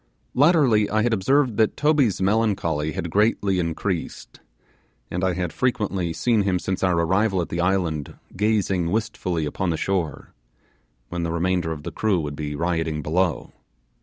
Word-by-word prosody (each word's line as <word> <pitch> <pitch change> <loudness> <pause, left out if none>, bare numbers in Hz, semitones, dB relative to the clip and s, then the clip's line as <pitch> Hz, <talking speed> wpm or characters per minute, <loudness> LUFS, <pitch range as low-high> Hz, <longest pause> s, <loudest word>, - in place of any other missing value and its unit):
Latterly 130 - +4
I 110 0 +1
had 120 -1 +1
observed 125 +3 +2
that 110 -1 +2
Toby's 145 - +2
melancholy 95 -8 0
had 85 +2 -4
greatly 100 -2 +2
increased, 85 +1 -3 0.7
and 90 +1 -2
I 95 -1 +2
had 90 -2 -3
frequently 100 -8 -1
seen 115 +5 +1
him 95 -2 +1
since 95 +1 -3
our 90 -2 +2
arrival 95 +4 +1
at 85 - -2
the 85 - -2
island 85 -6 -1 0.2
gazing 95 -4 +1
wistfully 95 -6 -2
upon 90 +5 -2
the 80 - 0
shore, 90 -5 -2 0.8
when 85 0 -3
the 85 -1 -2
remainder 85 0 0
of 75 -2 -6
the - - -5
crew 105 -5 +1
would 75 -2 -4
be 75 0 -4
rioting 80 -2 -1
below. 85 +3 -1
95 Hz, 160 wpm, -23 LUFS, 85-105 Hz, 0.8 s, Latterly